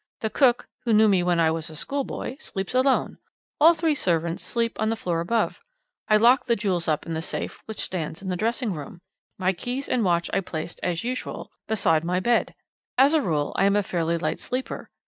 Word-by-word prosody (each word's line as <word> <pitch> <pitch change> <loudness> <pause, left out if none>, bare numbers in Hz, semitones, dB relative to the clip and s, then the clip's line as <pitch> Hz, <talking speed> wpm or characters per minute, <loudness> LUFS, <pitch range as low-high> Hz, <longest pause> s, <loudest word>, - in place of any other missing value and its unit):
The 220 - -1
cook, 250 -4 +3 0.2
who 235 -2 +1
knew 215 +1 +6
me 195 -3 +4
when 175 -1 +1
I 160 -1 +4
was 160 0 -3
a 155 - -10
schoolboy, 275 - -4
sleeps 195 -6 -5
alone; 260 +1 +2 0.4
all 330 +3 +7
three 320 -1 +1
servants 170 - 0
sleep 230 -1 -2
on 220 - +1
the 225 - 0
floor 175 -6 -2
above. 220 +7 0 0.5
I 215 - +5
locked 240 +5 +4
the 235 - +3
jewels 185 -6 -1
up 155 -1 0
in 165 - -4
the 160 - -2
safe - - -5
which 220 - -7
stands 160 -4 -3
in 195 - -8
the 180 - 0
dressing 230 +2 -1
room. 155 +2 -8 0.4
My 185 0 +1
keys 250 +9 -4
and 245 - +1
watch 170 -2 +2
I - - +3
placed, 165 -2 -5
as 175 +2 -1
usual, 250 +2 -4 0.2
beside 165 -7 +2
my 180 +2 0
bed. 235 +5 +1 0.4
As 275 +4 +6
a 315 - +4
rule, 150 - -1
I 195 - +4
am 200 0 +3
a 205 - +3
fairly 170 -2 -1
light 165 - -2
sleeper. 255 +1 -4
195 Hz, 215 wpm, -25 LUFS, 170-240 Hz, 0.5 s, all